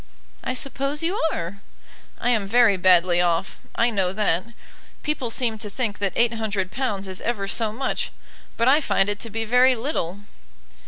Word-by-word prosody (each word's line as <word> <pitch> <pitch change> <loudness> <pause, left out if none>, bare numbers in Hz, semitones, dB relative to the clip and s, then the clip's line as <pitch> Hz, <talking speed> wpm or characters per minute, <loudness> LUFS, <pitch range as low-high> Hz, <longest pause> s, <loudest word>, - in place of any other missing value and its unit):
"I 255 - -2
suppose 275 +3 -3
you 360 +5 0
are." 175 +4 -5 0.6
"I 245 - +1
am 215 -5 +1
very 230 -1 +5
badly 180 -1 +4
off, 175 +2 0 0.2
I 235 +1 +2
know 190 -4 +1
that. 190 -4 +1 0.6
People 300 -6 -2
seem 225 -2 0
to 210 -1 -3
think 210 -1 -3
that 200 -2 -1
£800 220 -2 -1
is 190 0 -7
ever 210 -4 -2
so 220 +2 0
much, 260 +5 -2 0.5
but 230 - +2
I 285 +4 +6
find 195 -8 +1
it 205 0 -2
to 230 - -6
be 225 +1 -3
very 250 +3 +5
little." 215 - -3
220 Hz, 165 wpm, -23 LUFS, 195-245 Hz, 0.6 s, I